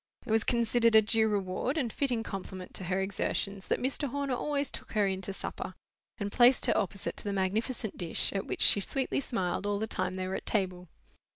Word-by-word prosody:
It 225 - -4
was 220 0 +3
considered 235 -1 +3
a 220 - +9
due 220 +1 +2
reward 205 - -1
and 245 -7 -1
fitting 245 -5 0
compliment 190 -3 -7
to 185 - -3
her 185 +2 0
exertions 195 0 -2
that - - +1
Mr. 275 +3 -1
Horner 280 0 -2
always 285 +2 -1
took - - -7
her 210 -2 +3
in 190 -1 -1
to 195 - -3
supper, 195 - -5 0.4
and 205 -3 -3
placed 245 +2 +5
her - - +2
opposite 195 0 -2
to - - -5
the 205 - -2
magnificent 215 +4 -1
dish, 170 -3 +1
at 195 - -2
which - - 0
she - - +7
sweetly 265 +8 0
smiled 195 -7 -2
all 205 0 0
the 215 - -1
time 185 -4 -2
they 185 0 -3
were 190 - -3
at - - -5
table. 185 -4 -1
205 Hz, 215 wpm, -30 LUFS, 190-240 Hz, 0.4 s, a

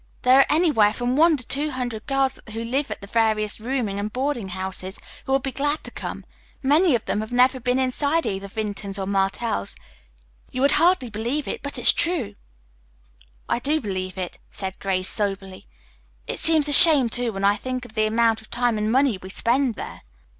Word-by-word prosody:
There 255 +2 +6
are 275 - +6
anywhere 295 -11 +3
from 245 +2 -2
one 320 +1 +4
to 250 - -7
two 295 +2 -1
hundred 245 -4 -5
girls 270 -1 0
who 225 +1 -4
live 270 +5 -2
at - - -6
the - - -8
various 215 0 0
rooming 225 -4 -3
and 210 +1 -4
boarding 260 -4 -2
houses 190 +1 -5 0.3
who - - -3
will 270 - +4
be 270 0 -5
glad 290 +3 -2
to - - -8
come. - - -7 0.4
Many 300 +3 +4
of 230 - -3
them - - -1
have 220 - -7
never 255 +1 +3
been 250 +1 0
inside 285 +5 0
either 195 0 -3
Vinton's 205 -1 -5
or 195 - -3
Martell's. 195 - -1 0.7
You 255 - -5
would 280 - +4
hardly 335 -9 +2
believe 235 +8 -3
it, - - -4
but 285 - -4
it's - - +6
true." 325 - 0 1.1
"I - - 0
do 295 +5 +1
believe 185 -5 -5
it," 180 -2 -6
said 190 -1 -6
Grace 185 -1 -1
soberly. 195 -2 -4 0.6
"It - - -5
seems 315 -2 +4
a 290 - +3
shame, 290 -4 +9
too, 240 0 +1
when 195 -1 -6
I 200 +1 +4
think 255 +3 -5
of 230 - -14
the 215 -2 +1
amount 225 0 +1
of 215 - -18
time 240 -2 0
and 215 +1 -1
money 260 -5 +2
we 185 - -9
spend 240 +4 0
there." - - -8
240 Hz, 200 wpm, -23 LUFS, 205-275 Hz, 1.1 s, shame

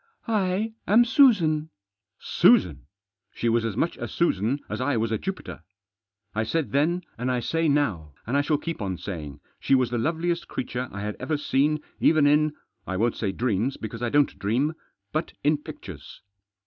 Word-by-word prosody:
"I 210 0 0
am 230 +4 +6
Susan." 180 - +4 0.5
Susan! 65 0 +3 0.5
She 120 - -1
was 115 0 +2
as 115 -2 -3
much 170 - 0
a - - -4
Susan 130 - 0
as - - -4
I 130 -1 +1
was 115 0 0
a 110 - 0
Jupiter. 90 - -6 0.7
I 110 - 0
said 155 +6 -1
then, 165 +6 +1 0.2
and 125 +1 0
I 125 - +1
say 165 +6 0
now, 95 - 0
and 120 - -2
I 140 - +4
shall 150 +1 +1
keep 165 -2 -5
on 95 -3 -2
saying, 75 -7 -7 0.2
she 135 - +3
was 125 -2 +1
the 120 - 0
loveliest 170 +5 -1
creature 125 0 -4
I 100 - -6
had 105 0 -4
ever 150 +4 -1
seen 150 +2 +1 0.2
even 155 -2 +4
in 150 +1 +3
— 100 -4 -44
I 95 - -2
won't 115 +3 +1
say 100 -4 -1
dreams, 120 +3 -1
because 115 +1 -7
I 120 - 0
don't 145 -8 +2
dream 120 +10 +1 0.2
— 100 0 -53
but 155 +2 -2
in 150 +1 +3
pictures. 95 - -10
135 Hz, 185 wpm, -25 LUFS, 110-155 Hz, 0.7 s, am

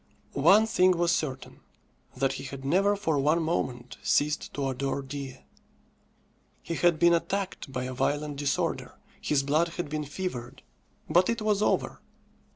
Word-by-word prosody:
One 215 +3 +5
thing 185 -5 +3
was 170 0 +2
certain, 135 -6 -3 0.6
that 135 +1 +1
he - - -6
had 135 0 -7
never 195 +8 +3
for 160 -8 0
one 150 +4 +3
moment 125 -7 -2
ceased 150 +1 +1
to 140 -1 -1
adore 135 +1 -2
Dea. 135 -1 -7 1.2
He - - -4
had 170 -1 +3
been 170 +1 +5
attacked 190 -3 -2
by 125 -1 -3
a 130 0 -4
violent 145 +3 -1
disorder, 140 -1 -1 0.3
his 145 -2 +1
blood 155 +4 +2
had 175 - -3
been 150 0 -3
fevered; 140 -6 -6 0.4
but 180 +1 +3
it 230 - 0
was 210 -1 +1
over. - - 0
150 Hz, 155 wpm, -28 LUFS, 135-175 Hz, 1.2 s, One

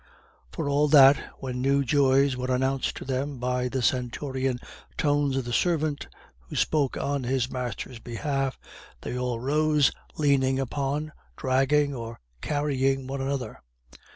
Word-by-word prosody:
For - - -3
all 145 +1 +3
that, 140 -2 +8 0.3
when 125 -2 -4
new 140 +1 +2
joys 135 -1 +3
were 125 0 -4
announced 130 +1 0
to - - -7
them 135 +1 -2
by 125 0 -1
the 130 0 -2
stentorian 130 +1 -1 0.4
tones 145 -2 +1
of 130 - -2
the 120 - -4
servant, 155 +1 0 0.3
who - - -11
spoke 145 -4 +1
on 140 -1 -1
his 130 0 0
master's 125 -1 -5
behalf, 135 +3 -2 0.4
they - - -5
all 125 -2 -2
rose, 150 +2 +3 0.3
leaning 135 -3 +2
upon, 140 +3 -2 0.3
dragging 135 +2 +2
or 115 -2 -7 0.2
carrying 135 -2 0
one 135 +1 -4
another. 135 -1 -3
135 Hz, 140 wpm, -26 LUFS, 125-145 Hz, 0.4 s, that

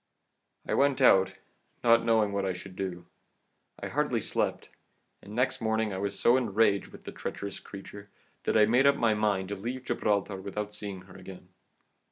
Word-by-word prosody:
"I - - -1
went 140 -1 +3
out, 95 -7 +5 0.5
not 115 -1 +5
knowing 110 -3 +3
what 100 0 0
I 95 -1 0
should 90 +1 -10
do; 90 -3 -5 0.7
I - - -4
hardly - - 0
slept, - - -2 0.5
and 105 +2 -10
next 125 +1 0
morning 110 -2 0
I 95 - -3
was 100 0 -3
so 120 +2 +5
enraged 105 -4 +2
with - - -14
the - - -7
treacherous 100 -1 -6
creature 100 0 -11 0.4
that - - +2
I 105 - +7
made 125 +5 +4
up 140 - +5
my 115 -4 +3
mind 105 -3 0
to 100 - -3
leave 120 +6 -5
Gibraltar 100 -1 0
without 100 +2 -5
seeing 100 -3 -5
her 90 0 -16
again. 90 -1 -11
105 Hz, 180 wpm, -29 LUFS, 95-115 Hz, 0.7 s, I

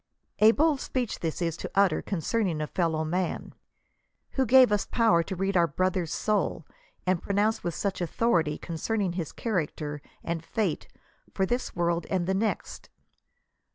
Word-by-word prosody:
A 215 - +8
bold 295 +2 +2
speech 250 -4 -2
this 160 -2 -2 0.2
to - - -5
utter 195 -4 +3
concerning 190 -1 -1
a 155 - -1
fellow 160 -1 0
man! 175 +2 -2 0.8
Who 265 -2 0
gave 255 -1 +7
us 205 -1 +1
power 225 -8 +3
to 190 +3 -4
read 195 +2 -1
our 170 -1 +5
brother*8 185 +2 0
soul, 195 -3 0 0.4
and 185 -2 +1
pronounce 205 +2 +1
with 170 -2 -2
such 195 -2 -2
authority 170 -4 +1
concerning 185 +3 -2
his 170 -4 -4
character 150 -8 -3 0.2
and 165 -1 -3
fate 190 -2 -2 0.5
for 190 - +2
this 245 +6 -2
world 170 -1 0
and 185 -3 0
the 190 - 0
next 215 +3 -2
185 Hz, 155 wpm, -28 LUFS, 170-215 Hz, 0.8 s, A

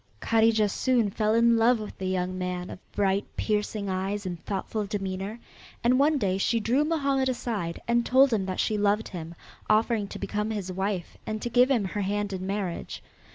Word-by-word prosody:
Kadijah 225 - +3
soon 235 -1 +1
fell 215 +2 +1
in 235 0 +5
love 230 +1 +4
with 215 - -7
the 190 - -2
young 185 0 -1
man 180 -1 -3
of - - -8
bright, 195 0 +1
piercing 210 -1 -1
eyes 195 +2 -2
and 175 -3 -5
thoughtful 205 +1 -2
demeanor, 195 +1 -4 0.4
and 250 +2 +4
one 295 +2 +4
day 195 -6 0
she 230 +3 +2
drew 245 +7 +2
Mohammed 280 -4 +1
aside 215 -9 -3
and 235 0 +3
told 260 +1 +5
him 195 -3 0
that 185 - -3
she 215 -1 +1
loved 205 +2 +1
him, 170 -2 -7 0.3
offering 215 -1 +2
to - - -7
become 210 +1 -2
his 200 -4 -3
wife 190 -1 -3
and 215 0 -2
to 240 - -3
give 250 +2 +5
him 240 -7 +2
her 205 +2 -3
hand 205 +1 -1
in 185 0 -4
marriage. 195 -3 -4
210 Hz, 195 wpm, -27 LUFS, 190-235 Hz, 0.4 s, in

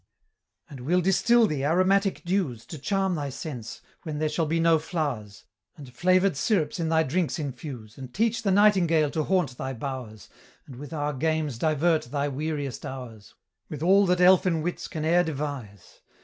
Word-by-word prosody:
"And 135 - -10
we'll 170 +9 +1
distil 225 +6 +4
thee 150 -8 -2
aromatic 185 +5 +2
dews, 170 - -1
To 155 +4 -9
charm 195 +4 0
thy 145 -4 -3
sense, 125 -5 -7 0.2
when 155 -2 -5
there 155 0 0
shall 155 +1 -1
be 165 +2 0
no 165 -1 +4
flow'rs; 145 - -4 0.3
And 135 -5 -12
flavor'd 185 +4 +2
syrups 165 0 0
in 165 -1 -1
thy 160 0 +3
drinks 165 +4 -1
infuse, 130 -6 -7
And 130 -2 -8
teach 225 - 0
the 210 - 0
nightingale 185 -7 +4
to 155 - -1
haunt 180 -10 0
thy 130 0 -3
bow'rs, 125 -5 -7 0.4
And 130 - -11
with 145 +1 -9
our 150 -2 -2
games 155 -3 -1
divert 160 +2 +1
thy 140 +3 -2
weariest 145 -1 -4
hours, 120 -6 -9 0.3
With 150 0 -6
all 195 +3 +5
that 180 0 +2
elfin 180 -3 +4
wits 175 +1 -3
can 155 -3 -4
e'er 170 +2 +4
devise. 140 - -6
155 Hz, 175 wpm, -26 LUFS, 135-180 Hz, 0.4 s, all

